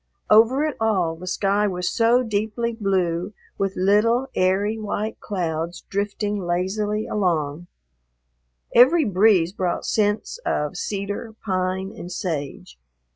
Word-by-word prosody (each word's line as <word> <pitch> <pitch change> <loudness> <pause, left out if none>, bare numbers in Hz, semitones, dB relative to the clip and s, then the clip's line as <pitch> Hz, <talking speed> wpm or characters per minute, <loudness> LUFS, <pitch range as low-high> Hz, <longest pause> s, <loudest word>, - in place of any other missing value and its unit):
Over 230 +7 +5
it 305 - -2
all 190 -7 +1
the 180 +3 -10
sky 200 +3 +1
was 180 -2 -2
so 235 +2 +3
deeply 220 +1 -2
blue, 190 -3 -1 0.3
with 195 -1 -1
little, 230 +7 +2
airy, 200 +4 +1
white 215 +1 -3
clouds 170 -3 -3
drifting 205 +1 -2
lazily 195 +4 -1
along. 170 -5 -1 1.1
Every 280 +6 +6
breeze 190 -3 +3
brought 185 -4 -2
scents 210 - 0
of 150 +4 -1
cedar, 205 +4 -4
pine, 185 0 -1
and 175 - -8
sage. 145 - -5
200 Hz, 120 wpm, -23 LUFS, 180-215 Hz, 1.1 s, Every